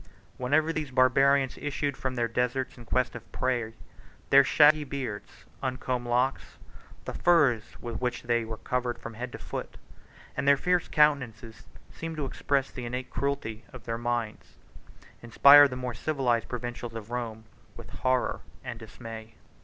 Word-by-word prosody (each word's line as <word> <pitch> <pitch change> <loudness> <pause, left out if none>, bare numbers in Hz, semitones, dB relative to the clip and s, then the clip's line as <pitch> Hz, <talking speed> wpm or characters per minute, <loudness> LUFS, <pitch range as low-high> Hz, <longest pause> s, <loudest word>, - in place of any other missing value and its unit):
39 85 +3 -22 0.3
Whenever 155 +6 +2
these 155 -3 -3
Barbarians 135 +1 +3
issued 145 -1 -2
from 130 0 -3
their 120 -1 0
deserts 125 +3 -1
in 120 - -13
quest 125 0 0
of 115 -1 -11
prey, 120 -3 -1 0.6
their 140 0 +8
shaggy 150 +2 +5
beards, 130 -7 -6 0.2
uncombed 130 -1 -2
locks, 125 +3 0 0.5
the - - -5
furs 145 -11 +2
with 120 +1 -6
which 125 -1 -2
they 120 -1 +1
were 110 0 -6
covered 125 0 -2
from - - -8
head 120 +3 -6
to - - -7
foot, - - -7 0.6
and 135 +1 -2
their 140 0 +6
fierce 180 +3 +1
countenances, 125 -7 +1 0.2
which - - -21
seemed 165 -1 -5
to 150 - -2
express 135 0 -1
the 125 - -6
innate 125 +1 -5
cruelty 120 -6 -3
of 125 -3 -11
their 115 +1 -4
minds, 120 -2 -3 0.7
inspired 140 +5 +8
the 125 - -5
more 125 -1 -4
civilized 125 -3 0
provincials 120 -1 -5
of 115 0 -8
Rome 115 -3 -4 0.3
with - - -11
horror 130 -1 0 0.2
and 120 -3 -6
dismay. 110 0 -10
125 Hz, 160 wpm, -28 LUFS, 115-140 Hz, 0.7 s, their